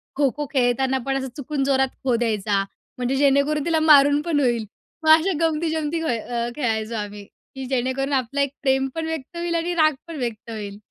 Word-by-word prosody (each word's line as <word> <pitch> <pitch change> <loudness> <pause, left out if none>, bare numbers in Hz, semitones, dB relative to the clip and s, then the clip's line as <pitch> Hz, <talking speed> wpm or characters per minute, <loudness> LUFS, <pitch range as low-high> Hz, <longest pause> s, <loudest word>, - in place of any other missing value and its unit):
खो-खो 290 +1 0
खेळताना 265 +1 +2
पण 270 0 0
असं 265 0 -3
चुकून 285 0 -2
जोरात 265 -1 +2
खो 250 -3 +2
द्यायचा, 210 -4 0 0.3
म्हणजे 250 +2 -1
जेणेकरून 280 +2 +2
तिला 325 -2 +2
मारून 290 -2 +6
पण 310 -3 0
होईल. 240 -4 +1 0.4
मग 315 - +2
अशा 360 +4 0
गमती-जमती 320 0 0
व्हा 300 - 0
अ, 235 +1 -3
खेळायचो 225 -4 -1
आम्ही, 205 -1 -5
की 265 +5 -11
जेणेकरून 260 +2 -1
आपला 270 +2 0
एक 280 0 -1
प्रेम 265 0 +2
पण 325 0 -2
व्यक्त 320 +1 -5
होईल 340 0 -2
आणि 340 +1 -1
राग 310 -2 +4
पण 330 -2 -7
व्यक्त 235 -3 -4
होईल. 205 -2 -6
270 Hz, 185 wpm, -23 LUFS, 240-305 Hz, 0.4 s, मारून